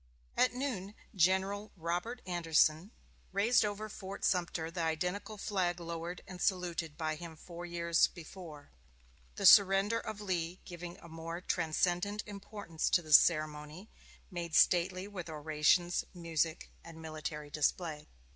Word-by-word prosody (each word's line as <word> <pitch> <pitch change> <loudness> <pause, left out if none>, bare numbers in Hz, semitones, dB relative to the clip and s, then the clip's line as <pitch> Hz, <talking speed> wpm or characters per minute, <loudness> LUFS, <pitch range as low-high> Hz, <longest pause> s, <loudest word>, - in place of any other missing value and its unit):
At 250 -1 +3
noon 220 -7 -3 0.2
General 190 +3 +1
Robert 175 +9 -3
Anderson 165 0 +2 0.4
raised 210 +6 +4
over 210 +1 -3
Fort 200 -2 -6
Sumter 170 -3 0
the 170 0 -3
identical 180 +6 -2
flag 185 -4 -1
lowered 170 +1 -5
and 180 -2 -9
saluted 175 -5 -1
by 155 -1 -1
him 165 +1 -8
four 175 +2 -9
years 170 -1 +3
before; 160 -4 -11 0.6
the - - -2
surrender 200 +2 +7
of 215 -1 -6
Lee 180 -3 -2
giving 175 0 -8
a - - -13
more 165 +1 -6
transcendent 180 +4 0
importance 200 -5 -4
to 175 - +3
this 155 -2 +9
ceremony, 155 +3 -1 0.4
made 170 -2 -4
stately 185 +2 +4
with 185 -5 -7
orations, 155 +3 +2
music, 165 -1 -1
and 165 -1 -11
military 155 -2 -6
display. 155 0 -1
175 Hz, 130 wpm, -33 LUFS, 160-195 Hz, 0.6 s, this